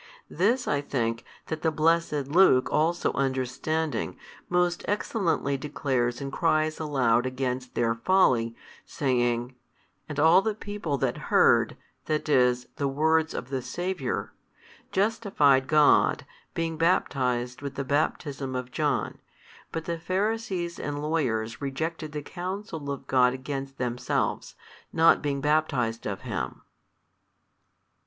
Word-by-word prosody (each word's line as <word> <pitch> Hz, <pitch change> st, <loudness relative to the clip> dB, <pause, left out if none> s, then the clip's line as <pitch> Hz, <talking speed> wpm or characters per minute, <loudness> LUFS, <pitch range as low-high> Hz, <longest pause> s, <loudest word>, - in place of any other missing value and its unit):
This 235 Hz, +9 st, +1 dB
I 145 Hz, -1 st, +1 dB
think 115 Hz, -5 st, -2 dB, 0.2 s
that 160 Hz, -1 st, -4 dB
the 160 Hz, -, +2 dB
blessed 155 Hz, -2 st, +1 dB
Luke 145 Hz, -5 st, +5 dB
also 170 Hz, +3 st, +1 dB
understanding, 135 Hz, +1 st, -1 dB, 0.3 s
most 175 Hz, 0 st, +1 dB
excellently 190 Hz, -, 0 dB
declares 130 Hz, -4 st, -1 dB
and 135 Hz, -1 st, -5 dB
cries 155 Hz, -2 st, +1 dB
aloud 130 Hz, -6 st, +2 dB
against 130 Hz, -1 st, -3 dB
their 115 Hz, -1 st, +2 dB
folly, 115 Hz, -5 st, +2 dB, 0.3 s
saying, 120 Hz, -2 st, 0 dB, 0.6 s
And 150 Hz, -1 st, -4 dB
all 160 Hz, +5 st, +6 dB
the 215 Hz, 0 st, -1 dB
people 205 Hz, -9 st, -3 dB
that -, -, -1 dB
heard, -, -, +4 dB, 0.3 s
that 155 Hz, 0 st, -1 dB
is, 125 Hz, -3 st, +3 dB
the 140 Hz, -, 0 dB
words 160 Hz, +3 st, +1 dB
of 125 Hz, -, -5 dB
the 135 Hz, -1 st, -2 dB
Saviour, 175 Hz, +2 st, -3 dB, 0.6 s
justified 190 Hz, -11 st, +2 dB
God, 150 Hz, 0 st, +4 dB, 0.3 s
being 165 Hz, -1 st, -2 dB
baptized 125 Hz, -7 st, 0 dB
with 140 Hz, -1 st, -5 dB
the 140 Hz, -, -2 dB
baptism 140 Hz, -1 st, -1 dB
of 125 Hz, 0 st, -4 dB
John: 145 Hz, -3 st, -1 dB, 0.5 s
but 160 Hz, -, -4 dB
the 170 Hz, -1 st, -3 dB
Pharisees 190 Hz, -1 st, -2 dB
and 145 Hz, 0 st, -3 dB
lawyers 125 Hz, -8 st, -1 dB
rejected 155 Hz, +3 st, -3 dB
the 150 Hz, -1 st, -5 dB
counsel 180 Hz, -4 st, -5 dB
of 140 Hz, -1 st, -5 dB
God 125 Hz, -1 st, +3 dB
against 135 Hz, +1 st, -5 dB
themselves, 125 Hz, -1 st, -2 dB, 0.7 s
being 145 Hz, -2 st, -1 dB
not -, -, -5 dB
baptized 140 Hz, -7 st, +1 dB
of 100 Hz, -2 st, -4 dB
him. -, -, -4 dB
145 Hz, 125 wpm, -27 LUFS, 130-165 Hz, 0.7 s, all